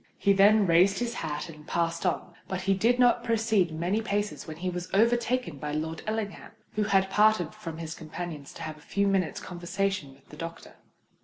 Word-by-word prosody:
He 200 - +4
then 205 +2 +6
raised 185 +3 +5
his 240 -1 -2
hat 155 -4 -4
and 150 -2 -12
passed 170 +1 0
on; 175 - -2
but 190 -1 -3
he 195 +1 +2
had 230 +6 +3
not 245 -1 +4
proceeded 220 -7 +1
many 180 +7 0
paces, 205 -3 -2
when 155 -1 -7
he 185 +2 -4
was 180 +1 -5
overtaken 235 - +2
by 150 +1 -4
Lord 160 +1 -3
Ellingham, 215 -2 -4 0.2
who 210 0 0
had 195 -2 +2
parted 210 -6 +3
from 165 -1 -7
his 165 -1 -5
companions 160 -2 -7
to - - -7
have 155 -1 -5
a - - -17
few 200 +5 0
minutes' 190 -4 +1
conversation 180 -4 -3
with 135 - -25
the 150 - -12
doctor. 165 +1 -7
185 Hz, 200 wpm, -28 LUFS, 165-210 Hz, 0.2 s, then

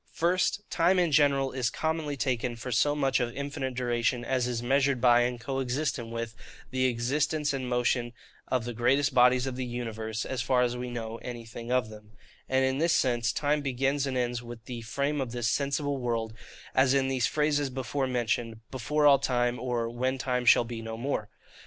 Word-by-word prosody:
FIRST, 180 +4 +1
Time 175 +2 +3
in 175 -3 +2
general 140 -2 +3
is 125 -3 0
commonly 160 -2 -2
taken 125 -2 -1
for 115 +2 -6
so 145 +5 +2
much 135 -2 +1
of 120 -1 -1
infinite 140 -2 -4
duration 120 0 0
as 125 -1 0
is 120 -1 -2
measured 135 +1 +2
by, 120 -1 +5
and 120 0 -1
co 135 +3 -3
existent 130 -2 -2
with, 115 -1 -4 0.4
the 130 0 +1
existence 145 +5 0
and 130 -2 -3
motions 120 0 +1 0.4
of 125 -3 0
the 120 - -4
great 130 +5 +2
bodies 125 0 +5
of 130 -2 -3
the 130 - -2
universe, 115 -3 -4
as 130 -2 -2
far 125 +1 +2
as 120 0 0
we 125 0 -4
know 115 -2 -5
anything 120 0 -7
of 125 -4 +1
them: 105 0 -13 0.4
and 130 0 +3
in 130 +1 0
this 165 +1 +3
sense 120 -3 +2
time 150 0 0
begins 135 +1 0
and 130 -1 -2
ends 120 -1 -1
with 120 -2 -10
the 120 -2 -6
frame 140 +5 -1
of 125 -3 -4
this 120 -2 -1
sensible 140 +2 0
world, 115 -3 -2 0.4
as 130 0 +4
in 135 -1 +2
these 130 -2 +1
phrases 150 -2 +1
before 130 +1 -2
mentioned, 115 -2 -1
'Before 150 +4 0
all 140 -2 +7
time,' 120 -2 0
or, 120 -2 -1
'When 130 +3 -1
time 125 -2 -1
shall 120 - +6
be 115 -1 -6
no 115 0 -6
more. 115 -4 -2
125 Hz, 195 wpm, -28 LUFS, 120-140 Hz, 0.4 s, all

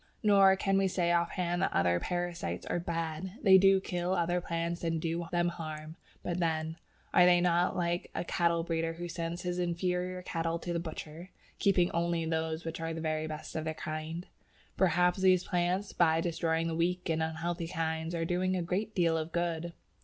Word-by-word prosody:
Nor 195 -2 +6
can 195 0 +1
we 195 - +3
say 175 -2 +1
off 170 0 +2
hand 175 -1 -1
that - - +1
other 85 0 +2
parasites 175 - -3
are - - -1
"bad." 165 +1 -3
They 190 -3 +8
do 195 0 +6
kill 180 0 -2
other 175 +1 +1
plants 170 0 -3
and 165 -1 0
do 165 +1 -2
them 175 0 +2
harm, 155 -2 -7 0.3
but 175 0 -2
then, 160 -1 -1 0.4
are 180 - +7
they 175 0 +6
not 175 +1 +2
like 175 0 -1
a - - -1
cattle 170 -1 +1
breeder 165 -1 -1
who 175 +1 -6
sends 170 +1 -4
his 180 0 -2
inferior 180 +1 -1
cattle 165 -1 -2
to 175 +1 -4
the 170 - 0
butcher, 165 +1 -7 0.3
keeping 180 -3 +3
only 170 -1 0
those 160 0 -2
which 165 0 -4
are 165 0 -3
the - - -4
very 155 -1 -1
best 155 0 -7
of 160 - -1
their 160 0 -3
kind? 155 +3 -5 0.5
Perhaps 180 0 +3
these 185 -1 +5
plants, 180 +3 -1
by 165 -2 +3
destroying 165 -1 0
the 165 -1 -2
weak 180 +2 0
and 160 -1 0
unhealthy 165 +2 -2
kinds, 160 +1 -2
are 165 0 -1
doing 185 +2 0
a 180 - -1
great 200 +6 -2
deal 170 -3 +3
of 160 0 -2
good. 170 0 -1
170 Hz, 195 wpm, -31 LUFS, 165-180 Hz, 0.5 s, They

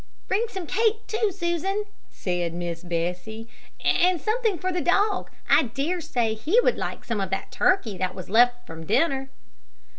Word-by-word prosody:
"Bring 435 +5 +1
some 380 -5 -5
cake 445 +5 +1
too, 435 -1 0
Susan," 380 +3 -1 0.2
said 175 -2 -2
Miss 170 -1 -4
Bessie, 180 +6 -3 0.4
"and 360 -1 +3
something 440 -1 0
for 370 +3 -2
the 355 -1 -1
dog. 400 +6 +2 0.2
I - - +6
dare 280 +9 -2
say 240 -8 0
he 305 - +2
would - - +3
like - - -5
some 225 -4 -1
of 190 - -2
that 195 - -3
turkey 225 - +1
that 185 -1 -1
was 185 - -7
left 245 +3 +4
from 160 0 -9
dinner." 270 +3 +1
275 Hz, 170 wpm, -25 LUFS, -, 0.4 s, I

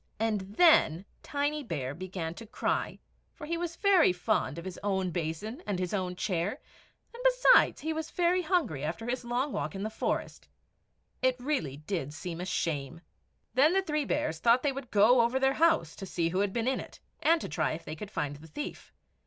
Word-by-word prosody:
And 220 -2 +1 0.2
then 200 - +5 0.2
Tiny 290 +1 -1
Bear 145 - -4
began 175 -1 -5
to 230 +5 -11
cry, - - -1 0.4
for - - -8
he 335 +3 -2
was 340 0 -3
very 385 - +5
fond 180 -5 -1
of 170 - -7
his 185 -1 -6
own 190 -2 0
basin 175 - -4
and 200 - -1
his 180 +1 -3
own 185 -3 -1
chair; 180 - -1 0.5
and, 480 +1 -9
besides, - - +5
he 320 +2 -1
was 320 0 -4
very 355 +1 +2
hungry 310 - 0
after 170 +9 -3
his 250 +1 -2
long 245 +4 -1
walk - - -3
in 195 - -4
the 215 - -3
forest. - - -3 0.7
It 255 -1 +3
really 245 - -2
did 150 -2 -4
seem 170 +1 -5
a - - -3
shame. 160 -4 -2 0.5
Then 290 +6 +5
the 385 0 +2
three 300 -4 -1
bears 160 -9 -1
thought 235 +4 +4
they 285 - +2
would 270 -2 -7
go 225 +4 +5
over 235 +3 +1
their 270 0 +3
house, 320 - +2
to 195 - -7
see 170 -2 0
who 185 +3 -1
had 200 -1 +1
been 230 +3 -1
in 265 - +1
it, - - -10 0.2
and 330 +1 +4
to - - -5
try 155 -2 -1
if 160 - -7
they 155 - -5
could 200 +5 -8
find 145 -7 -3
the 160 +2 -13
thief. 290 - -7
215 Hz, 205 wpm, -30 LUFS, -, 0.7 s, then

